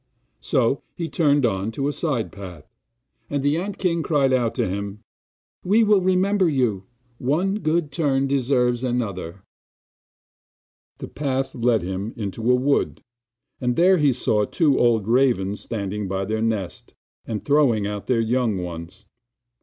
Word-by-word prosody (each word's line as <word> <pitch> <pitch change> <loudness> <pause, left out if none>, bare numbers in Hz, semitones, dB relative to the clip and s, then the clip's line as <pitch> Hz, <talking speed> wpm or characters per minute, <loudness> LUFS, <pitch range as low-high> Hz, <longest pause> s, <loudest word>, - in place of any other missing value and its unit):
So 130 -1 +1
he 170 - -3
turned 145 -5 +2
on 95 -2 -1
to 140 +4 -2
a - - +1
side 140 -8 -2
path 90 -6 -10 0.6
and 145 -1 -2
the 145 +1 +2
ant 195 +3 -4
king 170 -3 0
cried 140 -3 +2
out 120 -3 +1
to - - 0
him: 100 +3 -5 0.6
'We 210 +5 +4
will 210 -2 +4
remember 185 0 +2
you 120 -9 0 0.3
one 180 +10 0
good 155 -3 0
turn 140 -3 +1
deserves 125 -2 +1
another!' 100 -8 -3 1.5
The - - -7
path 135 -2 -2
led 115 -4 +1
him 95 +4 -4
into 110 +2 -3
a 125 - +6
wood, 140 +3 0 0.6
and 125 -1 0
there 180 +2 +4
he 145 -2 +4
saw 110 -4 +1
two 145 - +2
old 115 -4 +2
ravens 115 -5 +2
standing 105 -2 -4
by 95 +1 -2
their 110 +2 -2
nest, 110 -5 -3 0.3
and 105 -4 -4
throwing 140 -8 +3
out 105 0 -5
their 120 -3 +2
young 115 -2 0
ones. 90 +3 -7
125 Hz, 150 wpm, -23 LUFS, 105-145 Hz, 1.5 s, a